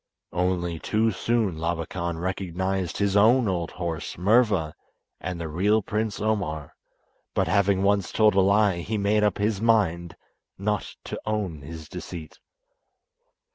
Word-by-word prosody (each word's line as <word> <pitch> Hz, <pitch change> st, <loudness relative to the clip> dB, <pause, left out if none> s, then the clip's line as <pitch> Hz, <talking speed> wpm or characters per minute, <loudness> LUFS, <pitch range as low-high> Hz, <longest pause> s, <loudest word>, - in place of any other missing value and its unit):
Only 90 Hz, -2 st, 0 dB
too 110 Hz, +5 st, +1 dB
soon 110 Hz, -3 st, 0 dB
Labakan 85 Hz, +1 st, -2 dB
recognised 95 Hz, 0 st, -2 dB
his 100 Hz, -1 st, +1 dB
own 115 Hz, +4 st, +5 dB
old 85 Hz, -3 st, -1 dB
horse, 85 Hz, -3 st, -4 dB
Murva, 100 Hz, -4 st, +3 dB, 0.5 s
and 90 Hz, -2 st, -4 dB
the 85 Hz, -, -4 dB
real 100 Hz, +7 st, +2 dB
Prince 105 Hz, +1 st, -2 dB
Omar, 100 Hz, -9 st, -2 dB, 0.6 s
but 95 Hz, -, +2 dB
having 100 Hz, +1 st, +2 dB
once 100 Hz, -2 st, +2 dB
told 110 Hz, -1 st, +4 dB
a 95 Hz, -, +4 dB
lie 100 Hz, -1 st, +3 dB
he 110 Hz, +6 st, -2 dB
made 105 Hz, +1 st, +2 dB
up 105 Hz, -, +2 dB
his 105 Hz, 0 st, 0 dB
mind 90 Hz, -7 st, +2 dB, 0.4 s
not 105 Hz, +2 st, -2 dB
to -, -, -6 dB
own 100 Hz, -8 st, -2 dB
his 80 Hz, +2 st, -9 dB
deceit. 90 Hz, -3 st, -8 dB
95 Hz, 135 wpm, -25 LUFS, 85-105 Hz, 0.6 s, own